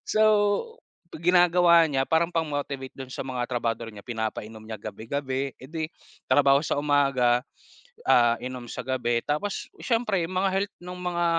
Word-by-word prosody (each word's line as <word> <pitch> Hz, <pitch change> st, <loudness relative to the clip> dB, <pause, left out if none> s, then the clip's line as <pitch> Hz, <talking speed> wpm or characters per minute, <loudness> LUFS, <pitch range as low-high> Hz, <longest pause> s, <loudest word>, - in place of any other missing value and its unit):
So, 215 Hz, -, +3 dB, 0.9 s
ginagawa 175 Hz, 0 st, +5 dB
niya, 135 Hz, -3 st, 0 dB
parang 165 Hz, +2 st, +2 dB
pang-motivate 145 Hz, -4 st, -3 dB
dun 130 Hz, -1 st, -8 dB
sa -, -, -5 dB
mga 125 Hz, -2 st, -3 dB
trabahador 115 Hz, -2 st, -2 dB
niya, 100 Hz, -, -9 dB
pinapainom 110 Hz, -1 st, -5 dB
niya 110 Hz, -2 st, -7 dB
gabi-gabi, 135 Hz, +4 st, -3 dB
eh 130 Hz, -, -10 dB
di, 160 Hz, -1 st, -2 dB, 0.4 s
trabaho 140 Hz, -1 st, +5 dB
sa -, -, -1 dB
umaga, 135 Hz, -4 st, +3 dB, 0.7 s
ah, 120 Hz, -1 st, +5 dB
inom 125 Hz, -1 st, -6 dB
sa -, -, -4 dB
gabi. 120 Hz, -2 st, 0 dB
Tapos, 150 Hz, +8 st, -2 dB, 0.2 s
siyempre 225 Hz, -7 st, +1 dB
mga 185 Hz, +2 st, 0 dB
health 195 Hz, +1 st, -1 dB
noong 180 Hz, 0 st, -8 dB
mga, 175 Hz, -1 st, 0 dB
140 Hz, 150 wpm, -26 LUFS, 125-170 Hz, 0.9 s, ginagawa